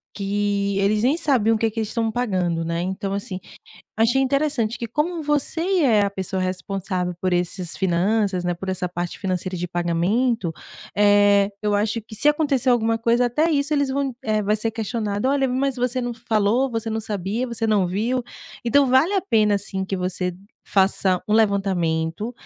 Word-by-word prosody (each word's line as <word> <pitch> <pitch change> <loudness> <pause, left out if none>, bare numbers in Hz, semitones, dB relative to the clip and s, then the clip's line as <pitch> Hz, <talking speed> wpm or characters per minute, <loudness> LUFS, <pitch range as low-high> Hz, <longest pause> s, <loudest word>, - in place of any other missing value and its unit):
que, 200 0 -1
eles 210 +2 +2
nem 275 +7 +2
sabiam 230 -8 +2
o - - 0
que 225 -1 +1
que 225 - -4
eles 220 - -1
estão 225 -1 -1
pagando, 185 -8 -1
né. 170 +1 -2
Então, 190 +2 -3
assim, 195 -2 -4 0.6
achei 240 +4 +3
interessante 270 -4 0
que 235 - -3
como 315 +7 -1
você 295 +2 0
e 370 +1 +1
é 220 -6 +4
a 200 - -1
pessoa 190 -1 -3
responsável 185 0 -2
por 185 -1 0
esses 175 0 -2
finanças, 190 +1 +1
né, 175 0 0
por 190 +2 -8
essa 185 -1 -2
parte 175 0 -4
financeira 185 -1 -3
de 175 +1 -3
pagamento. 175 +4 0 0.4
Eh, 205 -1 +5
eu 210 -1 0
acho 215 +2 0
que 220 +1 -12
se 290 +8 +2
acontecer 285 -4 +2
alguma 225 -1 +2
coisa, 235 +2 +2
até 305 +8 +1
isso 290 0 +1
eles 285 -2 +1
vão, 275 -2 -1
eh, 215 -3 0
vai 210 +1 +1
ser 225 +1 -1
questionado. 220 0 -2
Olha, 270 -1 +2
mas 265 +1 0
você 250 0 -1
não 240 -1 -3
falou? 230 +2 +1
Você 225 -1 -3
não 220 0 -2
sabia? 210 +3 -3
Você 230 -1 -2
não 205 -4 +2
viu? 235 +7 -1 0.4
Então 275 +4 +4
vale 260 +9 +3
a 390 - +3
pena 210 - +2
sim 190 -1 -4
que 195 0 -3
você 180 0 -2 0.3
faça 190 -1 +2
um 210 - +2
levantamento. 195 -2 +1
215 Hz, 185 wpm, -22 LUFS, 190-245 Hz, 0.6 s, Eh